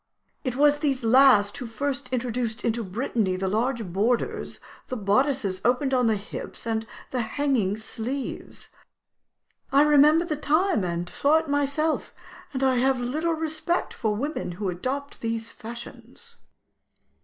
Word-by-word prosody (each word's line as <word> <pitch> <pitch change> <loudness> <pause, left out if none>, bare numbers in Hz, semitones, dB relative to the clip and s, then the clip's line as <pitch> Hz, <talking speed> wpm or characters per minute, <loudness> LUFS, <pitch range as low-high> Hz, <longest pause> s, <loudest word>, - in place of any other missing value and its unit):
It 255 -2 -2
was 295 +1 +4
these 275 -5 0
last 225 -4 +6
who 250 - -5
first 275 +3 -3
introduced 240 -2 -2
into 230 0 0
Brittany 205 -1 -1
the 190 +1 -2
large 230 +3 0
borders, 210 +7 -1 0.3
the 255 - -4
bodices 205 -2 +1
opened 255 +3 +2
on 250 -2 +3
the 220 - +3
hips, 200 +3 -7
and 225 -1 -1 0.2
the 255 - 0
hanging 225 -4 0
sleeves. 235 +5 -5 1.0
I 280 +2 +6
remember 300 +3 +5
the 305 -3 -2
time, 315 - +2
and 175 0 -2
saw 290 - +3
it 320 0 -2
myself, 285 +2 0 0.4
and 270 -2 -2
I 260 -1 +3
have 260 +1 +2
little 305 +7 -1
respect 320 +2 -1
for 215 -3 -1
women 275 - -3
who 190 +2 -3
adopt 265 +10 -4
these 230 0 -3
fashions.'" 240 - -10
250 Hz, 145 wpm, -25 LUFS, 220-285 Hz, 1.0 s, last